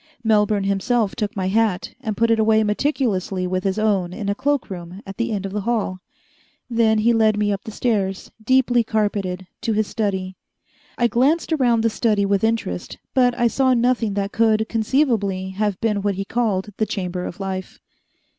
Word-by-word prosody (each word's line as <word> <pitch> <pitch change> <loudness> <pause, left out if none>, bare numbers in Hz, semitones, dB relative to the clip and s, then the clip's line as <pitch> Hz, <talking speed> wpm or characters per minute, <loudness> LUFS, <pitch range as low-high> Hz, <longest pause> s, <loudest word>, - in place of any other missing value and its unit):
Melbourne 210 -2 +2
himself 200 +2 0
took 210 -1 -3
my 190 -2 -1
hat, 210 -3 0
and 220 -5 -3
put 230 0 +3
it 225 - +3
away 220 0 +4
meticulously 210 -5 0
with 185 0 -2
his 195 +1 -1
own 200 -5 +1
in 200 0 -4
a - - +2
cloak 285 +5 0
room 180 +2 -8
at 195 0 -9
the 235 0 -1
end 200 -2 -2
of 195 - -4
the 210 +1 -2
hall. 210 -4 -1 0.7
Then 230 -2 +2
he 230 +2 +3
led 220 -2 +3
me 210 0 +1
up 200 - -5
the - - -7
stairs, 200 -4 -1
deeply 245 0 +3
carpeted, 205 -4 -1 0.2
to 225 - 0
his 215 0 +1
study. 190 -4 -3 0.6
I 240 - +2
glanced 275 +8 +2
around 245 -6 +3
the 230 - +2
study 210 -3 +1
with 200 0 +1
interest, 220 - -2 0.2
but 245 -2 +3
I 240 - +2
saw 260 +2 +3
nothing 235 -3 +1
that 200 0 -1
could, 220 -1 +2
conceivably, 220 -6 0
have 200 0 -1
been 210 -3 +1
what 200 -1 0
he 195 +1 -3
called 210 -4 -1
the 215 - 0
Chamber 180 -2 -3
of 180 - -7
Life. 190 -1 -5
215 Hz, 190 wpm, -21 LUFS, 195-230 Hz, 0.7 s, away